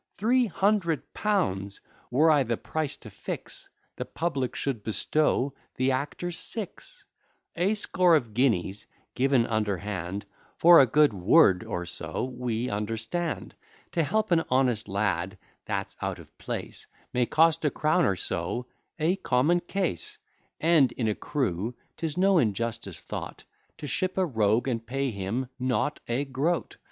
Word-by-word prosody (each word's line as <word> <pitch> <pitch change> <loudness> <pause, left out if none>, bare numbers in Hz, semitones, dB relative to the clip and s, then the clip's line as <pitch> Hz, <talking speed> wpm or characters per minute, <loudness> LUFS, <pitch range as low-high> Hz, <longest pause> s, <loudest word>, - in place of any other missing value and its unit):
Three 240 +4 +3
hundred 195 -5 0
pounds! 100 - -1 0.3
Were 150 +6 +4
I 150 -2 +5
the 120 -3 -1
price 155 -3 -3
to - - -12
fix, - - -7 0.3
The - - -2
public 140 -7 -2
should 135 -6 -2
bestow 135 +5 +1 0.2
the 130 +1 +2
actors 150 +6 -3
six; 230 - -7 0.5
A 185 +5 +2
score 180 -4 +4
of 120 -8 0
guineas 105 -5 +1 0.3
given 130 -2 +3
underhand, 100 -3 -2 0.3
For 170 0 +8
a 135 - +7
good 145 +1 +4
word 95 - +5
or 90 0 -4
so, 85 - -4
we 120 -1 -2
understand. 115 +10 -3 0.4
To 170 - +1
help 215 +6 0
an 165 -1 +4
honest 125 -4 +2
lad 95 -1 -1 0.3
that's - - -3
out - - -2
of - - -15
place, - - -5 0.3
May 125 -1 +2
cost 165 0 +4
a 150 - +3
crown 155 +5 +2
or 100 - +2
so; 90 +7 -3 0.3
a 170 +4 +1
common 160 +1 +2
case: 175 - -3 0.4
And, 160 -5 +4
in 115 - -1
a - - +1
crew, 115 - -2 0.2
'tis 160 -1 -3
no 190 -1 +4
injustice 115 - -1
thought - - -7 0.3
To - - -7
ship 185 +6 -1
a 190 - +3
rogue, 110 - +1
and 115 -3 -1
pay 135 +3 -2
him 100 +5 -2
not 130 +3 0
a 125 +4 0
groat. 145 +6 -1
130 Hz, 145 wpm, -27 LUFS, 110-165 Hz, 0.5 s, For